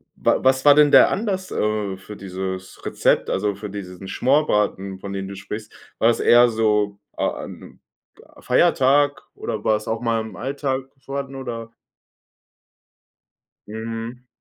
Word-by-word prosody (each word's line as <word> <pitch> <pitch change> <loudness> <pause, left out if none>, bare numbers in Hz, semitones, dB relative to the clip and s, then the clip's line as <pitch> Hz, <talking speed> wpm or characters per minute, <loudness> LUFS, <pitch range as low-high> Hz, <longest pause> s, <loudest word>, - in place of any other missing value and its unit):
wa - - +1
was 130 0 +3
war 145 -1 +8
denn 150 0 +6
der - - +7
Anlass, 190 -3 -2
äh, 105 -3 -1
für 105 +2 -10
dieses 95 -1 -6
Rezept, - - +1
also 100 +1 0
für 105 0 -7
diesen 95 -1 -8
Schmorbraten, 105 -8 +1
von 100 - -6
dem 95 -1 -4
du 100 - -7
sprichst? 105 +2 -7 0.3
War 115 - +4
das 120 - +2
eher 120 +1 +6
so 105 -3 +1 0.2
a - - +1 0.2
an - - -7 0.7
'n - - -20
Feiertag 145 +2 +3
oder 105 -1 -5
war 110 - +4
es 105 - -5
auch 110 0 -1
mal 115 -2 0
im 110 0 -9
Alltag 135 0 -2 0.2
vorhanden 135 0 -5
oder? 115 -3 -6 1.9
Mhm. 115 +3 -6
110 Hz, 150 wpm, -22 LUFS, 100-130 Hz, 1.9 s, war